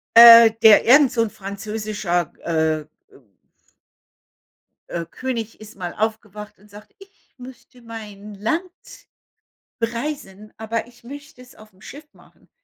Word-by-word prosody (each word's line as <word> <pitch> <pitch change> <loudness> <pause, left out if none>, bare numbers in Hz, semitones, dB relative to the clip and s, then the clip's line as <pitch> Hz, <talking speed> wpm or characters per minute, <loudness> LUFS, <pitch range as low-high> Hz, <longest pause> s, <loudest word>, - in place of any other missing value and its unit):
Äh, 230 -1 +10
der 220 -2 +7
irgend 265 +1 +5
so 230 - 0
'n 225 - -3
französischer, 200 -3 -4
äh, 160 -2 -1
äh 150 - -15 2.0
äh, 170 -1 -5
König 230 -5 -6
ist 215 -1 -14
mal 175 -3 -6
aufgewacht 210 -1 -5
und 205 +2 -23
sagt: 210 +1 -16
„Ich 390 +1 -21
möchte 250 0 -15
mein 210 -3 -11
Land“ 230 - -2 1.2
„bereisen, 230 -4 -5
aber 225 +1 -4
ich 240 -1 -22
möchte 285 +1 -12
es 250 0 -17
aufm 215 -3 -19
Schiff 290 +3 -12
machen.“ - - -25
220 Hz, 130 wpm, -20 LUFS, 205-245 Hz, 2.0 s, Äh